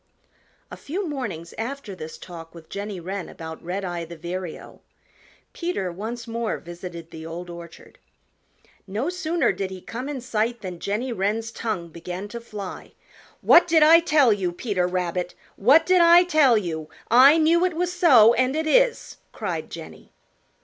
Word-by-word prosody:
A - - -8
few 365 +6 -4
mornings 205 - -5
after 235 -2 -5
this 160 -3 -8
talk 165 -2 -11
with 165 -1 -13
Jenny 200 -1 -5
Wren 190 +2 -5
about 160 -1 -9
Redeye 180 -1 -4
the 170 0 -10
Vireo 175 +1 -7 0.7
Peter 340 - -3
once 225 +6 -6
more 230 -1 -2
visited 170 -1 -9
the 160 - -9
Old 170 +2 -7
Orchard. 170 -1 -12 0.9
No 220 - -2
sooner 345 -2 0
did 195 -1 -4
he 190 -1 -8
come 250 +8 -6
in 285 -3 -4
sight 235 -1 -2
than 180 -3 -7
Jenny 215 +8 -2
Wren's 220 +3 -1
tongue 200 -9 -4
began 180 +4 -7
to 235 +2 -7
fly. 205 -5 -8 0.5
"What 345 - +6
did 320 -2 +5
I 325 +2 +8
tell 300 -8 +4
you, 190 -3 -2
Peter 180 -1 -1
Rabbit? 180 0 -2 0.2
What 280 +10 +5
did 365 -1 +4
I 340 +1 +7
tell 305 -9 +4
you? 160 -6 -4 0.2
I 265 +6 +8
knew 330 +2 +3
it 365 -3 0
was 355 +1 -1
so, 255 -11 +6
and 255 +3 +1
it 315 +1 -1
is!" - - +2
cried - - -4
Jenny. - - -11
215 Hz, 165 wpm, -24 LUFS, 175-285 Hz, 0.9 s, I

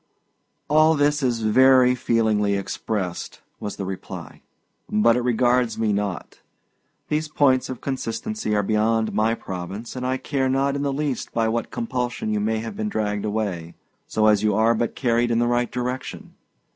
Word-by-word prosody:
"All 155 +2 +5
this 145 0 +2
is 120 -3 0
very 130 +3 +5
feelingly 110 -4 +1
expressed," 100 -1 -4 0.2
was 105 - -5
the 100 - -5
reply, 95 0 -7 0.5
"but 115 +2 +4
it 125 - +1
regards 120 0 +2
me 110 -2 +1
not. 100 -2 -4 0.7
These 155 +1 0
points 135 -4 +2
of 130 - -6
consistency 135 - -3
are 105 - +2
beyond 110 +2 +1
my 110 +2 +2
province, 95 +5 -7
and 125 - -4
I 130 +1 0
care 135 -1 -1
not 135 +1 +1
in 140 - -2
the 140 -1 0
least 140 -2 -3
by 115 -1 +1
what 115 0 -2
compulsion 120 -2 -3
you 105 - 0
may 110 +2 0
have 115 - -6
been 215 0 -2
dragged 105 - -2
away, 100 -6 -3 0.3
so 110 - +1
as 105 -2 +4
you 105 -2 +2
are 110 +2 +4
but 115 0 -2
carried 120 -2 +1
in 115 - +1
the 120 - +2
right 120 0 0
direction. 125 +1 -5
115 Hz, 170 wpm, -23 LUFS, 105-130 Hz, 0.7 s, All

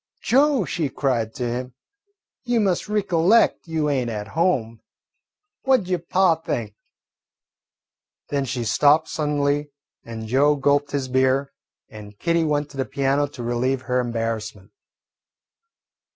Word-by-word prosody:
"Joe," 275 -4 +3
she 155 -1 -2
cried 120 -6 -1
to 125 -3 -2
him, 125 +1 -4 0.7
"you 240 -2 +1
must 195 -1 0
ricollect 200 -1 +2
you 160 -2 -1
ain't 130 -5 0
at 105 -2 -5
home. 125 - 0 0.8
What 265 -3 +3
'ud 180 - -10
yo' 180 -1 0
pa 180 +1 +2
think?" 115 -9 -4 1.6
Then 140 -1 -1
she 125 -2 -3
stopped 150 +8 +3
suddenly, 145 -1 -1 0.3
and 110 -1 -7
Joe 140 +5 +3
gulped 145 0 +1
his 140 -2 -2
beer 130 +2 +1 0.3
and 105 -1 -12
Kitty 170 +3 +1
went 145 -2 -1
to 140 - -12
the 135 - -1
piano 140 +1 0
to 130 -3 -9
relieve 125 +2 -1
her 125 0 0
embarrassment. 115 -4 -4
140 Hz, 135 wpm, -22 LUFS, 120-165 Hz, 1.6 s, Joe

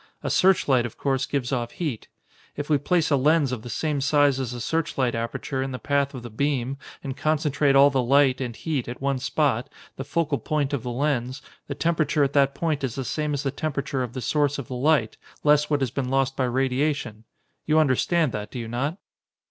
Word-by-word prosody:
A - - -1
searchlight, 140 -10 +3
of 115 - -14
course, 135 -1 0
gives 135 -4 -2
off 120 -3 -2
heat. 150 -11 -4 0.5
If 145 +1 -4
we 145 - +4
place 165 +1 +1
a - - +5
lens 145 0 +3
of 125 -4 -3
the 120 - -9
same 145 +4 -1
size 145 -1 +3
as 130 -3 -3
the 125 - -6
searchlight 130 -3 -1
aperture 115 +3 -3
in 135 0 -3
the - - -3
path 140 0 0
of 125 - -7
the 120 - -8
beam 135 +1 -1 0.2
and 135 -2 -4
concentrate 150 -2 +1
all 140 +1 +7
the 130 -1 +1
light, 135 +1 +3
and 120 -3 -4
heat, 150 -4 -3
at 120 - -6
one 135 -1 0
spot, 125 -2 0 0.3
the 135 - -4
focal 145 0 -1
point 150 -2 -1
of 140 - -1
the 125 - -5
lens, 130 0 -1 0.2
the - - -4
temperature 155 -3 +1
at 140 0 0
that 140 -1 +3
point 155 -4 -1
is 125 -4 -2
the 135 - -4
same 150 +3 -1
as 140 - -3
the 135 - -1
temperature 140 -2 -3
of 125 -2 -4
the 130 - -5
source 145 +1 +1
of 140 -5 -6
the - - -6
light, 130 -3 +2 0.3
less 150 0 +4
what 145 -2 +1
has 130 -4 0
been 130 -1 -2
lost 135 0 +1
by 130 - 0
radiation. 130 -2 -1 0.4
You 155 0 +3
understand 155 +1 +2
that, 105 -1 -5
do - - -8
you 115 -2 -4
not?" 135 +9 -2
140 Hz, 220 wpm, -25 LUFS, 125-150 Hz, 0.5 s, all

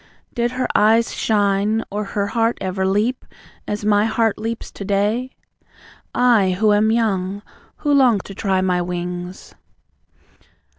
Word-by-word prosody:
Did 240 0 -1
her 255 0 -1
eyes 225 +2 +3
shine, 205 +1 +1
or 210 +1 -2
her 200 0 -2
heart 230 0 +1
ever 190 0 -2
leap 215 +6 0 0.4
As 210 0 -3
my 210 0 +3
heart 225 -1 0
leaps 225 +1 -5
to - - -8
day? 210 +6 -1 0.8
I, 210 -7 +3
who 215 -1 +4
am 210 +1 +3
young; 200 -3 -1 0.4
who 290 - +3
long 255 -6 +5
to 195 - -10
try 190 -2 0
my 180 -1 +1
wings! 180 +1 -5
210 Hz, 140 wpm, -20 LUFS, 195-230 Hz, 0.8 s, long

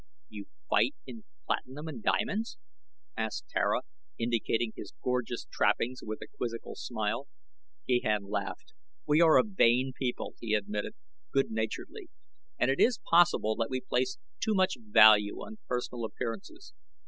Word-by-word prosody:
"You 105 -2 -9 0.2
fight - - +3
in 115 -4 -10 0.2
platinum 145 +5 -3
and 190 +8 -6
diamonds?" 215 +2 0 0.6
asked - - -3
Tara, - - +1 0.4
indicating 115 0 0
his 100 - -9
gorgeous 125 -1 -1
trappings 115 +5 +1
with 110 0 -5
a - - -10
quizzical 115 -1 -4
smile. - - -3 0.6
Gahan 110 -5 +2
laughed. 100 -1 -4 0.3
"We 150 +2 +4
are 160 -2 +7
a - - +6
vain 130 - +3
people," 125 -2 -3
he 110 -2 0
admitted, 105 0 -2 0.4
good 135 -3 +1
naturedly, 110 0 -4 0.5
"and 125 - +3
it 135 - -1
is 240 -2 +4
possible 165 -11 +5
that 115 -1 -1
we 130 -1 -1
place 130 +7 -1 0.2
too 220 -2 +1
much 190 0 +3
value 110 - +6
on 220 0 -9
personal 125 -1 -3
appearances. 190 - -6
125 Hz, 140 wpm, -30 LUFS, 110-160 Hz, 0.6 s, are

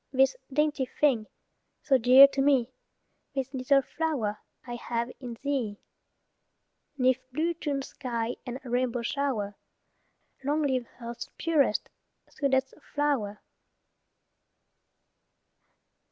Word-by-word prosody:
This 270 - +4 0.2
dainty 295 -1 +1
thing, 245 -8 +3 0.6
so 270 -3 +4
dear 255 +4 +9
to 275 - -1
me, 265 -3 +3 0.6
This 270 0 -2
little 270 +1 +3
flower 255 -10 -2 0.3
I 240 - -6
have 235 0 -3
in 245 -3 -7
thee. 255 -8 -1 1.2
'Neath 255 -1 +3
blue 320 +6 0
June 290 -4 -2
sky 240 -3 -3
and 250 0 -5
rainbow 245 -1 -1
shower, 230 -6 -1 0.9
Long 295 +3 +1
live 260 -4 0
earth's 235 +1 -6
purest, 295 -9 +2 0.4
sweetest 265 -2 0 0.2
flower. 270 -9 0
260 Hz, 100 wpm, -28 LUFS, 240-280 Hz, 1.2 s, dear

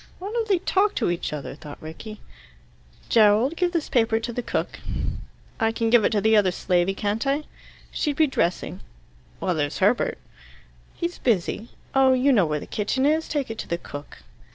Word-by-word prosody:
"Why 390 +3 -6
don't 460 -1 -1
they 395 -3 +3
talk 390 +3 +1
to - - +1
each 175 - -3
other?" 150 -2 -5
thought 145 0 -10
Rickie. 205 +7 -9 0.9
"Gerald, 225 +6 +4
give 355 0 +1
this 335 -4 -1
paper 225 -2 +2
to 235 +1 -4
the 245 - -2
cook." - - -3 0.8
"I 225 0 +2
can 225 0 -1
give 240 -2 +6
it - - +4
to 205 - +2
the 220 +1 +4
other 205 -3 +5
slavey, 180 +1 +1
can't 210 +5 -1
I?" 280 +2 +1 0.5
"She'd 295 -3 -1
be 315 - +4
dressing." 185 - -1 0.6
"Well, 180 - 0
there's 145 -2 -1
Herbert." 205 +6 +2 0.8
"He's 345 0 -3
busy. 220 0 0 0.2
Oh, 265 -1 +5
you 265 +2 +3
know 200 -8 +4
where 150 0 -1
the - - -8
kitchen 240 +6 -1
is. 315 +2 +2
Take 285 -6 -2
it 225 - -7
to - - -5
the 170 - -1
cook." 145 -4 -10
225 Hz, 190 wpm, -24 LUFS, 190-280 Hz, 0.9 s, give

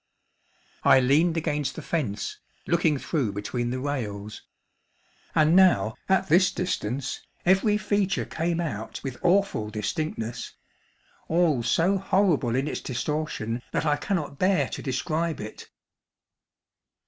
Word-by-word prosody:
I - - +7
leaned 155 +6 +3
against 150 -3 -1
the - - -7
fence, 110 - -2 0.3
looking 165 -3 +2
through 135 - -1
between 120 +4 -3
the 130 +1 -2
rails; 105 -7 -4 0.9
and 155 +2 +4
now, 185 -12 +5 0.2
at 190 0 +3
this 180 +4 +5
distance, 135 - -3 0.2
every 195 +3 +4
feature 205 -2 0
came 170 +1 -2
out 115 -10 -4
with 130 -3 -5
awful 180 - +2
distinctness—all 145 +5 -3
so 180 +10 +2
horrible 180 - +2
in 135 +3 0
its - - -3
distortion 125 -4 -3
that - - 0
I 150 -1 +3
cannot 155 -5 -3
bear 185 0 +2
to - - -5
describe 155 +4 -1
it. 105 +1 -8
150 Hz, 120 wpm, -26 LUFS, 120-175 Hz, 0.9 s, I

